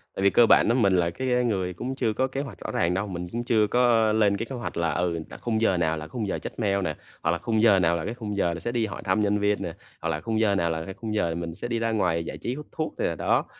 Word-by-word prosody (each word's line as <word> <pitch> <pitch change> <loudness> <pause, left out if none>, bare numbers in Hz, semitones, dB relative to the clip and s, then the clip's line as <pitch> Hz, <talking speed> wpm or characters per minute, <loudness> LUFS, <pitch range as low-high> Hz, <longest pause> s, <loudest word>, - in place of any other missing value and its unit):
Tại 95 - -2
vì 100 - +6
cơ 120 - +6
bản - - +5
á 120 - +3
mình 100 -7 +3
là 85 -1 +2
cái 125 +6 0
người 95 -6 -1
cũng 125 +8 -4
chưa 115 -5 0
có 130 +4 +1
kế 135 +1 -3
hoạch 130 -10 -8
rõ - - -5
ràng 85 +1 +1
đâu. 100 +3 -1
Mình 90 -2 -5
cũng 120 +1 -3
chưa 110 -3 +3
có 115 -2 +3
lên 105 -2 +3
cái 115 - -3
kế 135 - -4
hoạch 120 - -5
là, 85 -1 +1
ừ, 85 0 0
là - - -9
khung 110 -2 -1
giờ 95 -5 +3
nào 80 -2 +1
là 75 - -6
khung 105 +5 -4
giờ - - -2
check - - -8
mail 100 -2 +1
nè 95 - -2 0.3
hoặc - - +2
là 85 - 0
khung 110 +1 0
giờ 105 -4 +6
nào 85 -1 +3
là 80 - -4
cái 110 - -3
khung 105 -4 -5
giờ 85 -3 +1
là 85 - -5
sẽ 120 - -3
đi 115 -2 0
hỏi 100 - -6
thăm 100 +3 +2
nhân 105 0 +2
viên 105 0 +1
nè 85 -3 -4 0.3
hoặc 85 - -2
là 75 -1 -2
khung 110 -1 -1
giờ 105 -3 +3
nào 85 -3 +1
là 80 0 -3
cái 95 - -6
khung 110 +2 -5
giờ 85 -6 0
mình 85 -1 -5
sẽ 120 - -5
đi 120 -1 -1
ra 115 0 0
ngoài 85 -6 +1
giải - - -6
trí, 125 - -3
hút 150 +1 -8
thuốc 155 - -3
nè, - - 0
đó. - - +1
105 Hz, 325 wpm, -26 LUFS, 85-115 Hz, 0.3 s, vì